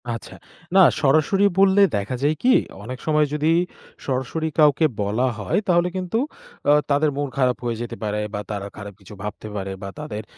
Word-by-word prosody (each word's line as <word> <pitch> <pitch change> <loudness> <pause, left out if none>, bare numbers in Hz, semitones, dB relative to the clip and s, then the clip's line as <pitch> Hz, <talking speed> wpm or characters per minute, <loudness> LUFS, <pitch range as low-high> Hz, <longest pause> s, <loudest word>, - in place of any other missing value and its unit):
আচ্ছা। 115 - -10 0.4
না - - +7 0.2
সরাসরি 155 +7 +3 0.2
বললে 195 +1 +5
দেখা 100 +5 -2
যায় 150 +2 +2
কি? 255 +1 +5 0.3
অনেক 125 +3 -7
সময় 155 -1 +3
যদি 150 +2 +1 0.5
সরাসরি 135 +5 -2
কাউকে 150 +1 +5 0.2
বলা 110 +6 +1
হয়, 100 - 0
তাহলে 175 -1 +3
কিন্তু 185 +3 -2 0.5
আ - - +7 0.2
তাদের 145 +1 +3
মন 145 0 -1
খারাপ 125 -2 +2
হয়ে 115 -1 -1
যেতে 120 - -5
পারে, 105 0 -1
বা 105 - -3
তারা 100 -1 -4
খারাপ 100 -1 -8
কিছু 100 +1 -13
ভাবতে 105 +1 -6
পারে 95 -1 -4
বা 100 - -4
তাদের 110 -8 -5
135 Hz, 180 wpm, -22 LUFS, 105-155 Hz, 0.5 s, না